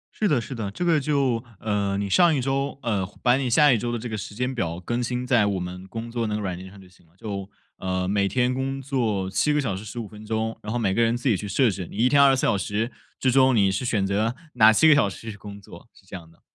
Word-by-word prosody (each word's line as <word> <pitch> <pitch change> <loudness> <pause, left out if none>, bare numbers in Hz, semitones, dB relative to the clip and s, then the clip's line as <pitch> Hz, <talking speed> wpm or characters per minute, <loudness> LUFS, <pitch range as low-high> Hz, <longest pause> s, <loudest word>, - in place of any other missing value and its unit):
是 215 - +1
的 145 -8 +2
是 120 - -6
的， 110 -5 -4
这 105 - -4
个 165 -3 +3
就 135 -5 0 0.2
呃， 100 -2 -1
你 100 0 -2
上 170 - +4
一 - - 0
周 135 +2 -1
呃， 105 -5 0 0.2
把 125 -1 +5
你 130 -2 -1
下 145 +2 +5
一 115 - +1
周 120 +2 -3
的 120 - -2
这 120 +2 -6
个 110 - -4
时 105 0 -7
间 125 +3 -2
表 85 -9 -3
更 120 +7 -2
新 125 +1 -3
在 120 -5 +3
我 100 -2 -1
们 90 +1 -7
工 115 +3 -6
作 115 -1 -2
那 105 - -2
个 105 - -3
软 95 -3 -3
件 95 +2 -10
上 100 +1 -15
就 95 - -15
行 90 - -23
了。 80 - -30
就 100 -1 -6 0.3
呃， 95 0 -2
每 100 0 +1
天 125 +4 +1
工 135 +1 -3
作 120 -8 -1
7 100 +10 +1
个 150 - +2
小 115 -9 -1
时 95 - -7
15 110 +1 -6
分 105 +1 -12
钟， 110 +1 -2
然 105 - -6
后 120 - -1
每 100 -5 0
个 115 - +1
人 115 +1 +2
自 125 - -3
己 115 - +4
去 105 +3 -5
设 115 +4 +2
置， 95 -2 -6
你 - - -10
一 120 +3 +4
天 140 +2 +5
24 135 -2 +5
小 - - +3
时 105 +4 -2 0.3
之 130 - +2
中， 130 0 +4
你 100 -3 +3
是 100 - -2
选 105 -5 0
择 105 +5 0 0.2
哪 110 -2 +7
7 135 +9 +4
个 155 - +8
小 140 -8 +3
时 110 +4 -8
去 - - -10
工 100 0 -10
作， 100 +2 -14
是 - - -21
这 95 - -10
样 85 -3 -10
的。 85 - -24
110 Hz, 295 characters per minute, -24 LUFS, 100-125 Hz, 0.3 s, 个